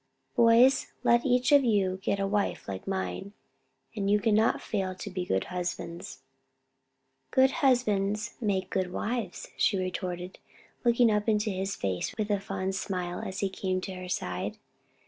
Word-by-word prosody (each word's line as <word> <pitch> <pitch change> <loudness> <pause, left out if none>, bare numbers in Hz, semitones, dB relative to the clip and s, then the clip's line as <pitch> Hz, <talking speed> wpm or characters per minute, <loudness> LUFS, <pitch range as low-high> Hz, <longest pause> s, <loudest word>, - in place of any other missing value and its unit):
"Boys, 240 +2 +5 0.2
let 235 +2 +4
each 250 +1 +3
of 285 -1 +7
you 195 -5 +1
get 200 - 0
a 195 - +1
wife 200 0 -1
like 95 -1 -6
mine, 195 +1 -3 0.6
and 200 -2 -1
you 210 +1 +4
can 215 +1 +2
not 220 +2 +3
fail 190 -3 -2
to 195 - -7
be 185 -1 -3
good 95 - +1
husbands." 175 -5 -5 1.1
"Good 265 0 +4
husbands 215 -5 +2
make 190 -4 -1
good 185 -2 -1
wives," 220 -2 -3
she 200 - +3
retorted, 185 -1 -4 0.4
looking 235 -1 +4
up 210 +1 +1
into 210 0 +1
his 190 +1 -2
face 95 - -2
with 210 -1 -1
a 205 - +2
fond 195 -1 -3
smile 180 -2 -3
as 190 +1 -5
he 195 - +1
came 185 -1 -2
to 190 - -5
her 185 0 -7
side. 90 - -3
195 Hz, 165 wpm, -29 LUFS, 185-220 Hz, 1.1 s, of